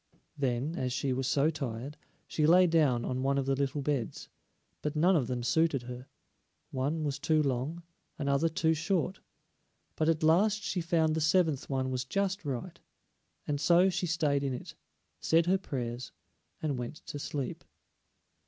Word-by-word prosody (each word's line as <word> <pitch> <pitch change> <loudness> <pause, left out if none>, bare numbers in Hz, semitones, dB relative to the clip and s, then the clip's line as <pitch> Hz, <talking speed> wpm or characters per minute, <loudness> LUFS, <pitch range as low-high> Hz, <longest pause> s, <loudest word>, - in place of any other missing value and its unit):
Then, 135 +3 -1
as 125 -1 -1
she 135 +1 0
was 130 0 -1
so 145 +3 +3
tired, 135 -2 -5 0.3
she 150 -1 +1
lay 180 +3 +7
down 150 -8 +2
on 130 0 -2
one 140 +1 +1
of 135 - 0
the 135 - +1
little 140 +1 -1
beds, 135 -6 -2 0.5
but 150 0 -3
none 175 +5 +4
of 135 -8 +1
them 125 -1 -3
suited 160 -1 +2
her; 125 +1 -8 0.6
one 145 +5 -1
was 145 -2 -2
too 155 -1 +2
long, 140 +6 -2 0.3
another 140 +2 +1
too 160 -1 +2
short; 180 +3 -1 0.8
but 155 0 +1
at 160 0 +1
last 205 +7 +3
she 185 - -1
found 165 -2 +2
the 160 - -1
seventh 160 -3 +2
one 130 -1 -1
was 130 -1 -1
just 195 +7 -1
right, 150 +5 -5 0.7
and 145 -1 -2
so 180 +2 +5
she 180 - -1
stayed 155 -4 +1
in 135 -2 -1
it, - - -8 0.5
said 165 +1 +3
her 190 +2 +2
prayers, 120 -7 -4 0.5
and 145 -5 -1
went 120 +4 -5
to 145 - -6
sleep. 140 -2 -4
150 Hz, 170 wpm, -30 LUFS, 130-165 Hz, 0.8 s, lay